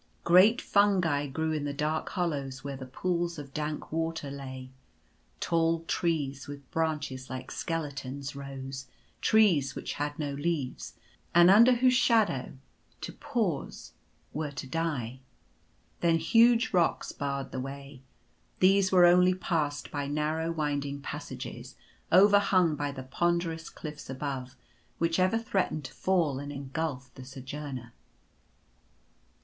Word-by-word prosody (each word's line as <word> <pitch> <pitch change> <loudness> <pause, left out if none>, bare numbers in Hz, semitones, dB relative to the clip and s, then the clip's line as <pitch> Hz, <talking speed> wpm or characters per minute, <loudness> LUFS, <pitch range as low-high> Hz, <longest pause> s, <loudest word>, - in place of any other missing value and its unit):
Great 190 +8 +6
fungi 180 -8 +2
grew 160 +4 -2
in 155 -2 -1
the 145 -1 -3
dark 155 +2 -1
hollows 140 -7 -3
where 140 -1 -4
the 130 -1 -8
pools 170 +4 -2
of 140 -2 -9
dank 150 0 -4
water 165 -2 -2
lay. 130 -2 -8 0.7
Tall 165 0 +1
trees, 150 -6 -1
with 140 -2 -10
branches 150 -5 -2
like 130 0 -6
skele 165 -3 -3
tons, 135 +1 -6
rose 135 -1 -7 0.2
— - - -36
trees 185 -11 +4
which - - -4
had 145 0 -2
no 145 -2 -3
leaves, 145 -3 -3 0.4
and 175 +1 +8
under 235 +5 +7
whose 250 +1 +4
shadow 225 - +2 0.5
to - - -6
pause - - -3 0.4
were 155 0 -2
to 135 -1 -7
die. 130 -5 -2 0.8
Then 170 -1 +3
huge 230 +8 +4
rocks 175 -3 +1
barred 140 -1 -4
the 130 - -4
way. 135 0 -8 0.6
These 190 +1 +4
were 180 -2 +7
only 180 +1 +5
passed 155 -5 -2
by 145 -1 -3
narrow, 155 +3 -1
winding 145 -3 -2
passages, - - -7 0.4
overhung 190 -3 +5
by 145 0 -2
the 135 -1 -7
ponderous 165 +3 -1
cliffs 150 -3 -9
above, 130 -1 -4 0.4
which 165 +1 +1
ever 185 +5 +3
threatened 190 -9 -1
to - - -8
fall 165 -8 +1
and 145 +1 -6
engulph 140 -1 -4
the 130 - -10
Sojourner. 130 -2 -7
150 Hz, 135 wpm, -29 LUFS, 140-175 Hz, 0.8 s, and